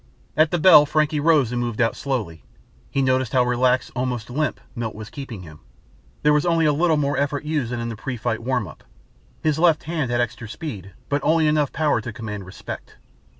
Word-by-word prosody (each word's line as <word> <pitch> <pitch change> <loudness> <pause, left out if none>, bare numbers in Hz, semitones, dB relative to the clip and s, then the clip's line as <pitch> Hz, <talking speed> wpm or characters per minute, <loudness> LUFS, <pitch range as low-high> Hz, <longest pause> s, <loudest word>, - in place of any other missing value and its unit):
At 155 0 +4
the 175 - 0
bell 155 -3 +7
Frankie 155 0 +1
rose 145 -6 +3
and 120 0 -1
moved 120 -2 -3
out 115 -1 +2
slowly. 110 - -3 0.5
He 135 - 0
noticed 130 -2 +1
how 130 -1 +4
relaxed, 125 +1 +1
almost 125 -2 -3
limp, 155 +4 -1 0.2
Milt 115 -2 -4
was 110 +1 -9
keeping 125 -9 -7
him. 75 -2 -12 0.6
There 150 - +5
was 150 0 +3
only 165 -2 +2
a 150 - +4
little 160 +1 +2
more 145 -1 0
effort 145 +1 -1
used 150 -6 -1
than 120 - -2
in 115 0 -3
the 115 - -5
pre 125 +3 -5
fight 110 0 -2
warm 125 -3 -1
up. 75 - -13 0.6
His 155 -1 +1
left 165 -2 +4
hand 160 -5 -2
had 120 0 0
extra 120 -1 -3
speed 105 - -7
but 145 0 0
only 160 0 +3
enough 150 -2 +2
power 155 -1 +1
to 120 - -6
command 105 -4 -6
respect. 90 - -8
130 Hz, 210 wpm, -22 LUFS, 115-150 Hz, 0.6 s, bell